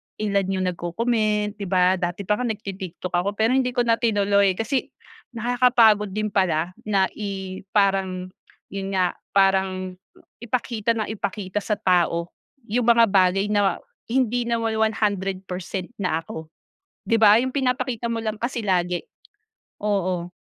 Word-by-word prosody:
iIan 200 -2 0
yung 185 -1 -1
nagko-comment 210 +3 -1
di 200 - -4
ba? 185 0 +3
Dati 175 +3 -3
pa 210 +5 0
nga 250 - -1
nagti-TikTok 195 -5 -5
ako 185 +4 0
pero 220 +3 +2
hindi 255 -1 +1
ko 245 - +3
na 230 -1 +2
tinuloy 200 -4 +3
kasi 225 +6 -1 0.5
nakakapagod 230 -4 +3
din 215 -1 -1
pala 175 -2 +1 0.2
na 195 -2 +2
i 190 -2 -5 0.2
parang 190 -2 +1 0.4
yun 195 0 -4
nga, 185 -1 +2 0.2
parang 190 -1 +2 0.5
ipakita 235 -2 -1
nang 215 - -1
ipakita 200 -2 -4
sa 210 - -1
tao 175 -4 +1 0.4
yung 235 +2 +1
mga 235 0 +7
bagay 195 0 +3
na 205 -1 +2
ma 190 - +2 0.3
hindi 245 -1 0
naman 230 -1 -1
100% 195 -4 -2
na 180 -5 -1
ako. 160 -1 -8 0.6
Di 230 - +2
ba? 215 -1 +7
Yung 260 0 -2
pinapakita 250 -3 -1
mo 230 -1 -2
lang 215 -1 -2
kasi 240 +1 -2
lagi 180 -3 0 0.8
oo. 185 -4 -1
205 Hz, 145 wpm, -23 LUFS, 185-225 Hz, 0.8 s, mga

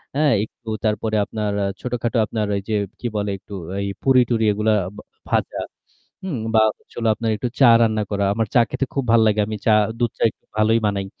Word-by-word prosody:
হ্যাঁ? 150 -1 +3
একটু 115 +1 -28 0.2
তারপরে 110 +1 0
আপনার 105 -1 -3
অ্যা 100 - 0
ছোটখাটো 120 -1 -2
আপনার 110 0 -2
ওই 100 - -2
যে 110 - +1 0.2
কি 120 - -3
বলে 105 -1 -1
একটু 100 - -14 0.3
এই 100 - -2 0.2
পুরি-টুরি 125 -4 +3
এগুলা 105 +1 +1 0.2
বা - - -10 0.3
ভাজা, - - 0 0.6
হুম, 180 -10 -3 0.2
বা 110 - +6 0.2
হচ্ছিলো 115 -1 -4
আপনার 115 0 -2
একটু 125 - -2
চা 130 - +8
রান্না 110 -1 +2
করা। 100 -1 0
আমার 115 +1 0
চা 120 - +6
খেতে 130 +1 -1
খুব 135 - 0
ভাল 115 - +6
লাগে। 105 0 +2
আমি 110 0 -4
চা, 110 - +5 0.3
দুধ 120 -1 +1
চা - - -6
একটু - - -31
ভালোই 110 +2 +3
বানাই। 100 -1 -1
110 Hz, 205 wpm, -21 LUFS, 105-120 Hz, 0.6 s, চা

